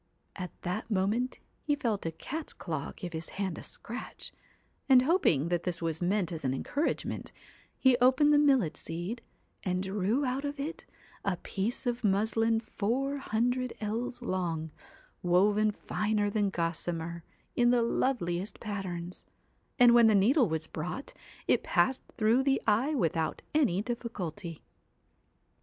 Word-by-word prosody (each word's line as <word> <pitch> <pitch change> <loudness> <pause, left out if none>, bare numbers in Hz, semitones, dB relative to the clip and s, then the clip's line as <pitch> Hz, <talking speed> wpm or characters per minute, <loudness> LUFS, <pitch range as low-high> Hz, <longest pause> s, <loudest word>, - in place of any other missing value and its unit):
' - - -43
At - - -8
that 185 +7 -3
moment 215 +5 0 0.2
he 295 -2 +1
felt 225 - -1
a - - -1
cat's 305 - -6
claw 155 -5 -4
give 175 -1 -7
his 160 0 -5
hand 190 -4 -2
a - - -7
scratch, 240 +3 -7 0.6
and 255 -1 +8
hoping 215 - +3
that 175 -1 +1
this 175 -2 -2
was 165 -1 -2
meant 180 0 +1
as 160 -3 -5
an 130 -1 0
encouragement, 285 - -2 0.5
he 260 -1 +5
opened 260 +4 +5
the 290 - +6
millet 265 - +3
seed 175 +8 -4 0.4
and 185 0 -1
drew 205 +8 0
out 260 +2 -1
of 285 0 -4
it 305 +4 -4 0.4
a 195 -3 0
piece 205 +9 -3
of 240 0 -1
muslin 220 +3 +2
four 245 +6 -1
hundred 245 0 0
ells 235 +4 -3
long, 170 -6 -2 0.5
woven 205 +4 +4
finer 210 0 -1
than 205 -1 +1
gossamer, 170 -1 -2 0.3
in 240 0 +4
the 240 -1 +4
loveliest 205 -7 -1
patterns; 185 -4 -5 0.5
and 245 -3 +7
when 235 -1 +7
the 215 - +5
needle 235 - +4
was 160 0 -2
brought, 180 - -5 0.3
it - - +3
passed 260 0 +2 0.2
through 225 +3 +4
the 270 0 +2
eye 235 +8 +2
without 165 - 0
any 225 - +2
difficulty. 205 -8 -5
210 Hz, 150 wpm, -30 LUFS, 175-250 Hz, 0.6 s, and